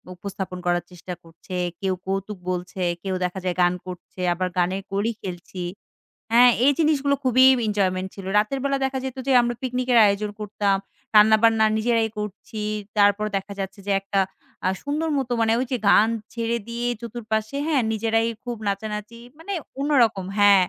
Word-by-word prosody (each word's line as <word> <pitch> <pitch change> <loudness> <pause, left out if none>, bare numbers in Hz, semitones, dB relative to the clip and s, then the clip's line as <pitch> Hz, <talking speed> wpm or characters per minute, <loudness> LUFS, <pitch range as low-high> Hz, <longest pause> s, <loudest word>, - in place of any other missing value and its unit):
উপস্থাপন 190 0 -6
করার 175 0 +1
চেষ্টা 180 +1 -8
করছে। 165 +3 -10 0.3
কেউ 190 -1 +1
কৌতুক 195 +2 -3
বলছে, 180 +1 -4 0.2
কেউ 190 -1 -2
দেখা 180 +1 -3
যায় 180 -1 -1
গান 175 0 +4
করছে 180 0 -10
আবার 185 +1 -1
গানের 185 +2 +1
কলি 200 +4 0
খেলছি। 180 0 -6 0.7
হ্যা, 235 +2 +7 0.2
এই 285 - +7
জিনিসগুলো 290 -3 +3
খুবই 255 0 +5 0.2
এনজয়মেন্ট 190 -3 0
ছিল। 195 - -8
রাতের 215 +6 +1
বেলা 275 0 +1
দেখা 265 0 -2
যেত 265 -1 -5
যে - - +3
আমরা 240 0 -1
পিকনিকের 250 -1 +1
আয়োজন 205 +1 +1
করতাম। 205 -1 0 0.4
রান্নাবান্না 220 +1 +6
নিজেরাই 225 0 +1
করছি, 210 +1 -6 0.4
তারপর 205 +1 +4
দেখা 195 +1 -6
যাচ্ছে 195 +1 -5
যে - - +1
একটা 195 0 -1 0.5
আ - - +4
সুন্দর 300 +3 -1
মতো 260 -3 -2
মানে 225 0 +3
ওই 255 - 0
যে 255 - +1
গান 215 +2 +6 0.2
ছেড়ে 235 0 -1
দিয়ে 235 +1 -3
চতুর 235 0 -7
পাশে 220 +3 -1
হ্যা, 315 -3 +2
নিজেরাই 225 +1 +1 0.2
খুব 240 -1 -4
নাচানাচি 210 +3 -4 0.2
মানে 395 +5 -5 0.3
অন্যরকম 240 -9 +2
হ্যা। 205 -1 +7
210 Hz, 165 wpm, -24 LUFS, 195-240 Hz, 0.7 s, হ্যা